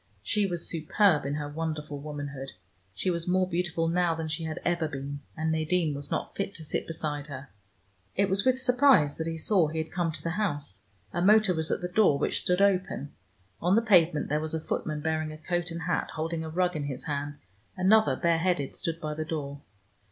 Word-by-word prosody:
She 200 - +1
was 175 -2 0
superb 160 -1 +2
in 140 - -1
her 150 -1 -3
wonderful 150 -1 -4
womanhood: 140 -2 -6 0.4
she 185 - 0
was 170 0 -3
more 185 +1 +2
beautiful 175 -2 -1
now 170 0 +2
than 160 -1 -4
she 160 +1 -2
had 160 +2 -4
ever 170 -2 +1
been, 140 -1 -5 0.2
and 160 0 0
Nadine 160 0 +1
was 140 0 -6
not - - -2
fit 195 0 -3
to 160 - -8
sit - - -2
beside 150 -3 -4
her. 140 -1 -8 0.7
It 200 +1 +3
was 195 +1 +1
with 255 0 +3
surprise 250 - +4
that 160 - -2
he 165 0 -3
saw 175 0 +3
he 155 +2 -5
had 160 0 -3
come 175 -2 0
to 155 - -6
the 165 - -1
house. 145 - -2 0.3
A 175 - 0
motor 210 0 +5
was 160 -1 -2
at - - -1
the 180 - -2
door, 180 -5 +4
which - - +1
stood 180 +2 +2
open. 185 -7 +1 0.5
On 180 +3 +3
the 225 - +5
pavement 175 -8 +4
there 150 +1 +1
was 155 +1 -2
a - - -1
footman 155 -1 -3
bearing 155 0 -1
a 155 - -8
coat 175 +2 -2
and 165 0 -5
hat, 175 0 -1
holding 160 +1 -2
a 160 - -5
rug 180 +2 +1
in 150 -2 -2
his 135 -3 -4
hand: 145 -1 -3 0.4
another, 190 -5 +4
bareheaded, 170 -2 +1
stood 165 -3 -3
by 155 -2 -3
the 155 +1 -3
door. 145 -3 -4
160 Hz, 215 wpm, -28 LUFS, 150-180 Hz, 0.7 s, motor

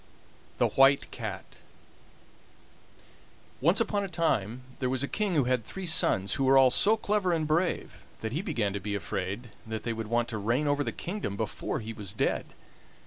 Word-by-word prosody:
THE - - +3
WHITE 135 +1 +4
CAT - - -6 2.0
Once 170 +8 +4
upon 210 -3 +1
a - - -2
time 130 - 0 0.2
there 130 - 0
was 130 +1 0
a - - 0
king 205 0 -1
who 145 - +4
had 125 -1 +1
three 190 - -7
sons, 100 - +2
who 135 - 0
were 135 +1 +6
all 130 -1 +7
so 215 - +4
clever 205 -3 +1
and 160 -2 +1
brave 165 +4 -1 0.2
that 110 - -3
he 155 - -1
began 120 - -1
to 100 - -2
be 100 +1 -3
afraid 100 +4 -4 0.2
that 110 -1 -4
they 115 - -1
would 115 -1 -5
want 120 +1 +1
to 110 -2 -3
reign 120 +8 +1
over 145 0 +1
the - - -2
kingdom 175 - -4
before - - -3
he 110 +1 -6
was 100 -4 -5
dead. - - 0
130 Hz, 190 wpm, -29 LUFS, 110-170 Hz, 2.0 s, all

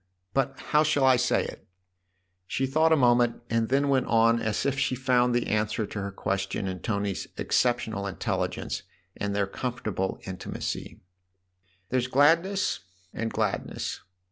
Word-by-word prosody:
But 135 0 0
how 150 - +6
shall 150 -2 +2
I 130 -1 +6
say 125 +1 +2
it? - - -9 0.4
" 90 - -47 0.3
She 135 - 0
thought 155 +5 +3
a - - +7
moment 120 -2 +3
and 115 -1 +1
then 140 +2 +2
went 135 -2 +2
on 115 0 +4
as 105 -4 -1
if 135 -1 0
she 130 -1 +1
found 125 -1 +2
the 120 - +1
answer 105 0 0
to 105 - -5
her 100 0 -4
question 95 0 -2
in 95 -1 -4
Tony's 100 -2 -2
exceptional 110 -5 0
intelligence 95 - -2 0.3
and 100 0 -2
their 100 0 +2
comfortable 105 -3 -3
in 95 -1 -6
timacy. - - -5 0.4
" 90 0 -41
There's 125 -1 +1
gladness 165 +9 +3 0.3
and 115 -1 -3
gladness. 105 -3 -2
115 Hz, 160 wpm, -27 LUFS, 100-130 Hz, 0.4 s, a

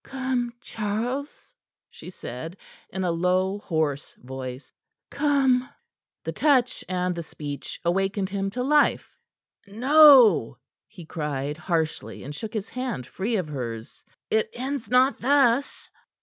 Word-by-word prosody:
"Come, 260 -3 -2
Charles," 235 +8 -4 0.4
she - - -11
said, 160 +1 -8 0.3
in 190 - -4
a 180 - +1
low, 185 +3 +1
hoarse 155 -6 -2
voice. 130 +1 -8 0.4
"Come!" 270 -4 +2 0.5
The - - -3
touch 265 -5 +2
and 180 -1 0
the 170 - -5
speech 145 -3 -7
awakened 195 +2 0
him 195 0 -2
to 250 - 0
life. 295 +2 +2 0.5
"No!" 245 - +6 0.3
he 175 - -12
cried 150 -3 -3
harshly, 160 -1 -2
and 145 - -7
shook 215 +9 -7
his 210 -1 -3
hand 250 - -4
free 205 - -3
of 185 -6 -1
hers. 115 -5 -6 0.3
"It 220 0 +2
ends 260 -1 -4
not 255 +3 +3
thus." 270 0 +2
195 Hz, 125 wpm, -25 LUFS, 160-250 Hz, 0.5 s, No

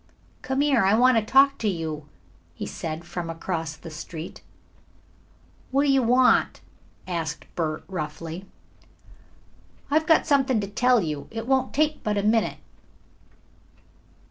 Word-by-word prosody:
"Come 265 +1 -1
here, 280 -6 +3
I 195 +3 +4
want 250 +1 +5
to - - -4
talk 275 +4 +4
to 220 - -1
you," 160 -5 -3 0.5
he - - -5
said, 160 +1 -5
from 175 -1 -5
across 165 -2 -4
the 165 - -10
street. 160 +1 -8 1.3
"What 275 +2 +2
do 285 - +3
you 270 -1 +4
want?" 250 +2 +3 0.5
asked 165 -3 -3
Bert 155 -2 -2
roughly. 165 +1 -6 1.5
"I've 310 +1 +2
got 320 - +5
something 270 -4 +2
to 200 - -3
tell 245 +2 +3
you. 150 -3 -4
It 225 0 -5
won't 265 0 +1
take 305 +1 +1
but 210 -1 -1
a 200 - 0
minute." 220 +1 +2
210 Hz, 140 wpm, -25 LUFS, 165-260 Hz, 1.5 s, want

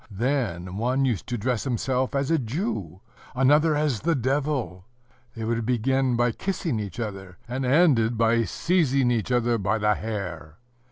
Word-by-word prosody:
then 100 -6 -2
one 130 +5 +1
used 115 -10 -1
to 120 - -2
dress 120 +1 -1
himself 130 +1 -1
as 140 +2 0
a 165 - +3
Jew, 110 - -4 0.3
another 150 +4 +4
as 145 -6 0
the 165 +6 +1
Devil: 130 - -2 0.5
they 115 - -5
would 115 +1 -1
begin 125 +2 +1
by 120 0 +2
kissing 165 - -2
each 100 0 -6
other, 95 -5 -6
and 130 +2 -3
ended 125 -6 +3
by 115 +1 +3
seizing 140 - +1
each 115 0 -1
other 120 -1 +2
by 100 +2 0
the 105 0 +2
hair. 90 -8 -5
120 Hz, 160 wpm, -25 LUFS, 105-135 Hz, 0.5 s, another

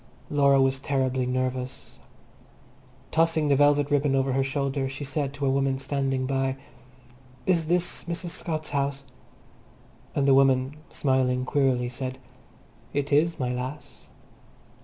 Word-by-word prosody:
Laura 140 -1 +4
was 135 0 +2
terribly 130 -2 0
nervous. 130 0 -3 1.1
Tossing 160 -2 +2
the 140 - +5
velvet 145 0 +3
ribbon 145 -1 +2
over 135 0 +1
her 135 +1 +2
shoulder, 135 0 -1
she 135 +2 -6
said 145 0 -2
to 145 0 -4
a - - +3
woman 135 0 +1
standing 135 -1 -1
by, 135 0 -1 0.9
"Is 170 -4 +2
this 175 +1 0
Mrs. 170 0 -4
Scott's 155 -1 -4
house?" 140 -1 -1 1.1
and 140 -1 +2
the 135 - +6
woman, 135 0 +3
smiling 130 -2 +1
queerly, 130 -3 +1
said, 130 +1 -5 0.8
"It 145 0 -1
is, 165 +3 +3
my 125 -2 -1
lass." 130 +4 -7
135 Hz, 135 wpm, -26 LUFS, 130-145 Hz, 1.1 s, the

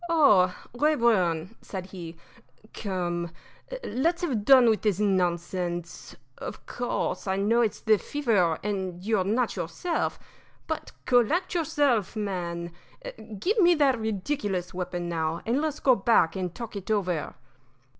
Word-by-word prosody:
"Oh, 210 - +5 0.2
Rayburn!" 230 - +2
said 190 -2 -6
he, 170 -3 -8 0.6
"come, 175 -4 -3 0.5
let's 335 - 0
have 250 -11 -1
done 260 -3 +7
with 220 -2 +3
this 210 -3 +1
nonsense. 175 -3 -1 0.2
Of - - -7
course, 245 -4 -3
I 190 - +1
know 215 +5 +2
it's 225 -3 0
the 215 -2 +4
fever 210 - +1
and 190 -3 -3
you're 215 -3 +2
not 225 +5 0
yourself; 355 -2 -2 0.5
but - - -4
collect 255 - +2
yourself, 280 - +1
man 175 -5 -3 0.7
give 415 - 0
me 350 -2 +6
that 275 -5 +3
ridiculous 205 -3 -2
weapon, 180 -1 -4
now, 165 -1 -2
and 245 +5 +1
let's 310 -1 -2
go 260 - +5
back 200 -5 +3
and 180 -2 -3
talk 235 -3 -7
it 200 0 -7
over." 185 -7 -1
205 Hz, 135 wpm, -27 LUFS, 180-245 Hz, 0.7 s, done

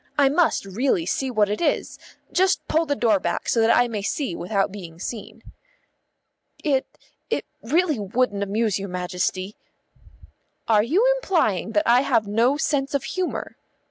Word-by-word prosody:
I 280 -2 +5
must 320 - +2
really 195 -3 0
see 265 +8 -1
what 215 -4 +2
it 210 +1 -3
is. 340 - -1 0.3
Just 375 +1 +1
pull 325 +1 +1
the 285 - +1
door 220 -6 +2
back 170 -2 -3
so 230 - +2
that 225 - +3
I 245 - +4
may 220 -3 -4
see 200 - -2
without 195 +1 -1
being 175 -5 -9
seen." 215 +3 -7 1.2
"It 275 -4 +1 0.4
it - - -1 0.2
really 310 +1 +1
wouldn't 205 +1 0
amuse 205 0 0
your 200 0 -5
Majesty." 180 +2 -3 1.1
"Are 215 -2 +5
you 335 - +2
implying 270 - 0
that 310 +4 +2
I 240 +2 +6
have 225 -5 +1
no 235 +7 +2
sense 285 -2 0
of 280 - 0
humour?" 370 -1 -4
230 Hz, 160 wpm, -23 LUFS, 200-285 Hz, 1.2 s, I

